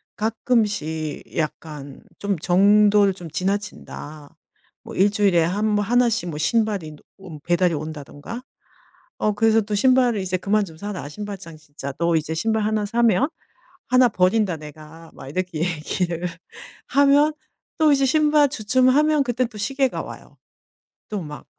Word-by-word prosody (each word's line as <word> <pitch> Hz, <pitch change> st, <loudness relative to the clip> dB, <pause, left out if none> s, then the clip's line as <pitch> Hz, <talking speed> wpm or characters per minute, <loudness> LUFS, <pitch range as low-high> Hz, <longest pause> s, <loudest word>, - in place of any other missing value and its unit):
가끔씩 210 Hz, -, -1 dB
약간 150 Hz, -3 st, -5 dB, 0.2 s
좀 200 Hz, -3 st, -1 dB
'정도를 200 Hz, +3 st, +4 dB
좀 180 Hz, -3 st, -10 dB
지나친다.' 180 Hz, -5 st, -5 dB, 0.5 s
뭐 -, -, -9 dB
1 200 Hz, +2 st, +4 dB
주일에 195 Hz, -5 st, +3 dB
한 200 Hz, +6 st, -1 dB
뭐 205 Hz, -1 st, +1 dB
1 245 Hz, +3 st, +3 dB
씩 220 Hz, -6 st, -2 dB
뭐 150 Hz, -, -5 dB
신발이 200 Hz, -1 st, 0 dB
노 150 Hz, -, -17 dB
온 175 Hz, -6 st, -10 dB
배달이 175 Hz, 0 st, +2 dB
온다던가. 155 Hz, -, -7 dB, 0.7 s
어 210 Hz, -, +1 dB
그래서 225 Hz, +1 st, +3 dB
또 210 Hz, 0 st, -3 dB
"신발을 245 Hz, -1 st, +3 dB
이제 185 Hz, 0 st, -1 dB
그만 210 Hz, +3 st, +1 dB
좀 165 Hz, -5 st, -10 dB
사라, 200 Hz, -6 st, -6 dB
신발장 190 Hz, -3 st, -8 dB
진짜. 145 Hz, -2 st, -8 dB
너 170 Hz, 0 st, +2 dB
이제 160 Hz, 0 st, -1 dB
신발 220 Hz, +6 st, 0 dB
1 215 Hz, 0 st, 0 dB
사면 235 Hz, +3 st, +2 dB, 0.6 s
1 255 Hz, -1 st, +5 dB
버린다 185 Hz, -2 st, +1 dB
내가." 155 Hz, +2 st, -12 dB
막 135 Hz, -, -10 dB
이렇게 180 Hz, +1 st, -3 dB
얘기를 170 Hz, +1 st, -2 dB, 0.6 s
하면 285 Hz, +2 st, +4 dB, 0.5 s
또 310 Hz, -2 st, +5 dB
이제 275 Hz, -1 st, +3 dB
신발 300 Hz, +1 st, +4 dB
주춤하면 260 Hz, +5 st, +3 dB
그땐 245 Hz, -1 st, -1 dB
또 220 Hz, -, -14 dB
시계가 265 Hz, +5 st, -1 dB
와요. -, -, -11 dB, 0.7 s
또 210 Hz, -, -3 dB
막 150 Hz, -4 st, -9 dB
200 Hz, 260 characters per minute, -22 LUFS, 165-230 Hz, 0.7 s, 1